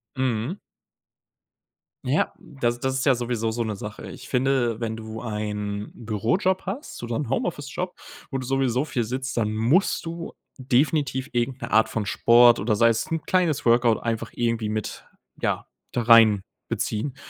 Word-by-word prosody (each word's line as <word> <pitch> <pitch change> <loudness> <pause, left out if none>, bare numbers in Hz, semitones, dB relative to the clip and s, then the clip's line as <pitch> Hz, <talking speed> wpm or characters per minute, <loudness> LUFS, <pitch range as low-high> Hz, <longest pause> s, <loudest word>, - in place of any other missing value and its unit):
Mhm. 130 - -1 1.5
Ja, 135 +5 +1
das 120 -4 -2
das 130 +1 -1
ist 135 - -1
ja 135 - +6
sowieso 120 -2 -1
so 120 +1 -3
'ne 110 -2 -3
Sache. 105 +2 -8
Ich - - -10
finde, 125 -3 +1
wenn 115 -2 -2
du 110 0 -7
einen 105 -2 -4
Bürojob 120 - 0
hast 200 - -6
oder 120 -1 -2
'n 145 -6 -3
Homeoffice 145 +1 -2
Job, 180 0 -3 0.4
wo 135 - -1
du 130 - -5
sowieso 135 0 +1
viel 125 -6 -1
sitzt, 130 +3 -4
dann 110 -2 0
musst 120 - +2
du 165 0 -5 0.3
definitiv 135 0 +1
irgend 125 +2 -1
'ne - - -5
Art 110 +1 +4
von 110 -2 -2
Sport 120 +4 +6
oder 105 +1 0
sei 115 - +5
es 115 -1 +1
'n 160 -1 -1
kleines 165 -6 +1
Workout 120 -1 +4
einfach 115 -1 -2
irgendwie 115 -2 -1
mit 110 -1 -4 0.4
ja - - -1 0.2
da 120 - -1
reinbeziehen, 110 +2 +3
120 Hz, 165 wpm, -24 LUFS, 110-135 Hz, 1.5 s, ja